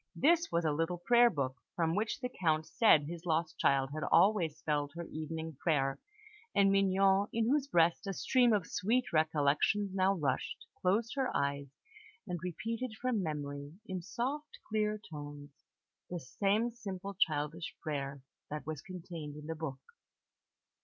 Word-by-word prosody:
This 335 +3 +3
was 170 0 +1
a 155 - +3
little 165 +4 -1
prayer 240 +6 +5
book, 135 - -2 0.2
from 165 -1 +1
which 215 +7 -1
the 250 - -1
Count 160 -2 +2
said 160 -2 +5
his 165 +3 -6
lost 165 -2 -1
child 135 -1 +3
had 155 - -4
always 170 -2 +4
spelled 145 -2 -1
her 170 - -4
evening 160 -1 -5
prayer; 135 -5 +1 0.6
and 195 -1 +5
Mignon, 195 0 +4
in 230 0 +1
whose 280 +2 +2
breast 170 -1 +3
a 195 - -1
stream 245 +3 +3
of 205 -6 +2
sweet 235 +7 0
recollections 155 +6 +2
now 190 +1 +3
rushed, 145 +4 -2 0.2
closed 215 +6 +1
her 265 -2 +1
eyes, 140 0 -1 0.6
and 180 -4 -3
repeated 225 +6 -4
from 250 -4 0
memory, 145 -3 -4
in 185 -3 -4
soft, 270 - -4
clear 215 -1 0
tones, 145 -1 -8 0.6
the 175 - -3
same 205 - 0
simple 200 -4 -6
childish 155 -2 -1
prayer 140 -3 -3 0.3
that 150 0 -5
was 155 -3 -4
contained 170 -5 -7
in 150 0 -9
the 160 - -3
book. 150 -4 -5
170 Hz, 155 wpm, -33 LUFS, 150-205 Hz, 0.6 s, prayer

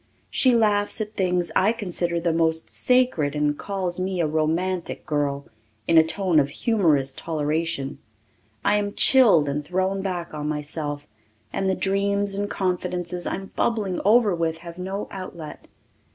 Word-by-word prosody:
She 255 -2 +3
laughs 210 -2 +2
at 215 0 -4
things 180 -4 0
I 200 +4 +4
consider 175 -5 -2
the 170 -1 0
most 160 0 +1
sacred 250 - +2
and 150 0 +1
calls 185 0 -2
me 185 0 -2
a 170 - +2
romantic 165 +4 -1
girl, 145 -3 -1 0.4
in 165 - +3
a - - +6
tone 175 0 +2
of 140 -1 +1
humorous 150 - +1
toleration. 155 -2 -2 0.7
I 210 - +4
am 205 -1 -2
chilled 215 - +6
and 145 +1 -2
thrown 190 +4 -1
back 180 -4 -4
on 150 0 -3
myself, 150 -1 -4 0.5
and 195 - 0
the 190 - +1
dreams 200 +1 0
and 205 +1 -2
confidences 180 -1 -2
I - - -1
am 195 0 -9
bubbling 210 -6 0
over 215 -1 +4
with 165 -1 -1
have 170 +1 -9
no 190 +3 -4
outlet. 170 -5 -8
180 Hz, 155 wpm, -24 LUFS, 155-195 Hz, 0.7 s, a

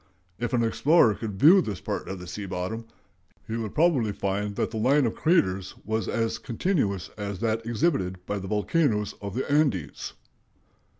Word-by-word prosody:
If 120 +1 -2
an 120 -2 +3
explorer 115 +1 +4
could 100 -2 -6
view 175 - +8
this 100 - -4
part - - -4
of 95 - -4
the 90 - -9
sea 100 +3 -6
bottom, 95 +5 -4 0.6
he 110 - -3
would 110 -3 -4
probably 145 -10 +3
find 100 +1 -2
that - - -1
the 110 - -4
line 135 +5 +3
of 115 - 0
craters 95 - +1
was 110 +1 -1
as 115 -1 -1
continuous 115 - -1
as 100 -2 -4
that 115 0 0
exhibited 115 - 0
by 100 +1 -2
the 95 - -6
volcanoes 105 - +1
of 100 0 -5
the 130 - -2
Andes. 140 - 0
110 Hz, 175 wpm, -26 LUFS, 100-130 Hz, 0.6 s, view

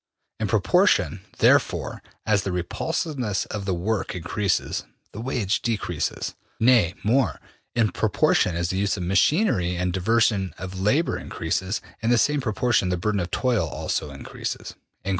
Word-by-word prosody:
In - - 0
proportion, - - +3 0.2
therefore, - - +2 0.2
as 105 -3 +3
the 95 - -3
repulsiveness 115 - -2
of 105 -2 -5
the 95 - 0
work 105 +3 -2
increases, 90 +2 -1 0.3
the 110 - -7
wage 115 -5 0
decreases. 115 -3 -2 0.3
Nay 110 -7 +4
more, 120 +5 +2 0.4
in 115 -4 +2
proportion 85 - +2
as 85 +1 -1
the 95 - -2
use 100 +1 +1
of 90 - -3
machinery 95 - +2
and 90 0 -1
diversion 100 0 +2
of 95 +1 -6
labor 140 - +2
increases, 95 +3 -2 0.2
in 115 - 0
the 120 - +5
same 150 +4 +2
proportion 120 -4 +1
the 90 - 0
burden 105 +3 0
of 90 -1 -2
toil 120 -10 +1
also 75 +1 -3
increases.'' 70 -1 -6
100 Hz, 145 wpm, -24 LUFS, 90-115 Hz, 0.4 s, the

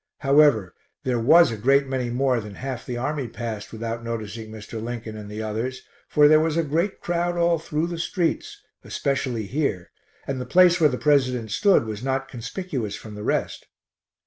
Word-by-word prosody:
However, 135 - +4 0.3
there 125 -2 0
was 165 +6 +6
a 115 - -4
great 135 +6 +3
many 130 -2 -2
more 125 0 +1
than 105 -2 -8
half 130 0 -6
the 120 - -3
army 140 +1 -2
passed 110 -2 -6
without 115 +1 -5
noticing 110 -1 -5
Mr. 110 +1 -8
Lincoln 115 -1 -5
and 105 -1 -8
the 105 +1 -5
others, 115 +4 -3 0.2
for 150 0 +5
there 155 +1 +6
was 160 0 0
a 165 - +2
great 165 +7 -1
crowd 175 0 -1
all 170 -1 +2
through 155 0 -2
the 170 -1 -5
streets, 175 0 -2 0.2
especially 130 -5 -2
here, 105 - -2 0.3
and 135 -2 -3
the - - -4
place 180 +3 +5
where 155 - +6
the 125 - -3
President 130 -7 +1
stood 200 - +3
was 110 -1 -5
not 135 0 -1
conspicuous 125 - -4
from 110 - -10
the 105 - -8
rest. - - -2
130 Hz, 185 wpm, -24 LUFS, 115-150 Hz, 0.3 s, was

